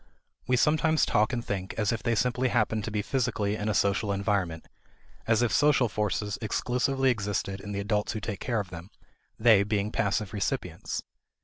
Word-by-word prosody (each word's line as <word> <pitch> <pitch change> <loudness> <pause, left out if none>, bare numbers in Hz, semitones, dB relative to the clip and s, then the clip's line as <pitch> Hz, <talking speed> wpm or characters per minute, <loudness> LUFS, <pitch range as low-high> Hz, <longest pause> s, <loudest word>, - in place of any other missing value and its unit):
We 125 - +3
sometimes 155 +3 +3
talk 105 +3 +2
and 120 -2 -3
think 95 -1 -4
as 105 -3 +1
if 115 - -2
they 115 - +1
simply 125 +2 +1
happened 110 -3 +1
to - - -3
be 105 -1 -1
physically 115 -6 0
in 105 0 -2
a 105 - 0
social 100 +2 +1
environment; 100 -5 -1 0.6
as 115 +1 +3
if 120 - +1
social 145 -4 +4
forces 105 -1 -2
exclusively 125 +4 +1
existed 100 -3 -2
in 105 - -7
the 100 0 -2
adults 105 +1 -1
who 110 - -3
take 105 -2 -5
care 120 -3 -1
of 100 -3 -5
them, 85 +2 -9 0.5
they 110 -3 +6
being 105 0 -1
passive 100 -1 -1
recipients. 100 -2 -3
105 Hz, 185 wpm, -28 LUFS, 100-120 Hz, 0.6 s, they